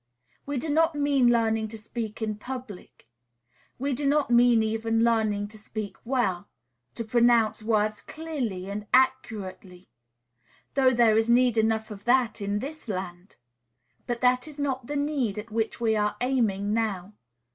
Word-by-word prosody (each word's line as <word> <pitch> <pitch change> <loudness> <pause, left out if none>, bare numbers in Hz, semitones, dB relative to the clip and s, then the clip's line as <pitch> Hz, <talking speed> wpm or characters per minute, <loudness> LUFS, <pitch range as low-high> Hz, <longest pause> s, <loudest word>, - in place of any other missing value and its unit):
We 285 -1 -2
do 290 - -2
not 320 +2 +2
mean 285 -3 +3
learning 225 -2 +2
to 220 +1 -8
speak 220 0 -6
in 215 -1 -2
public. 245 - -9 0.7
We 275 +2 -1
do 280 +3 -1
not 285 -2 +2
mean 240 -1 +5
even 225 +1 0
learning 215 -3 +1
to 215 0 -12
speak 215 -1 -6
well, 235 -8 -1 0.5
to 230 - -3
pronounce 235 -1 +3
words 215 -1 0
clearly 260 - -5
and 205 +1 -5
accurately; 205 -8 -1 0.8
though 265 -2 +4
there 235 -3 +4
is 225 +1 0
need 245 0 +4
enough 220 0 +1
of 205 -1 -10
that 240 -3 +2
in 200 0 -1
this 285 +5 -7
land! 185 -2 -6 0.7
But 240 -1 -3
that 250 +2 +2
is 300 -1 -10
not 265 -4 -2
the 290 - -4
need 285 -8 -1
at 215 +2 -7
which 225 0 -2
we 225 -2 +1
are 210 0 0
aiming 220 -6 0
now. 210 -4 -2
230 Hz, 155 wpm, -26 LUFS, 210-255 Hz, 0.8 s, mean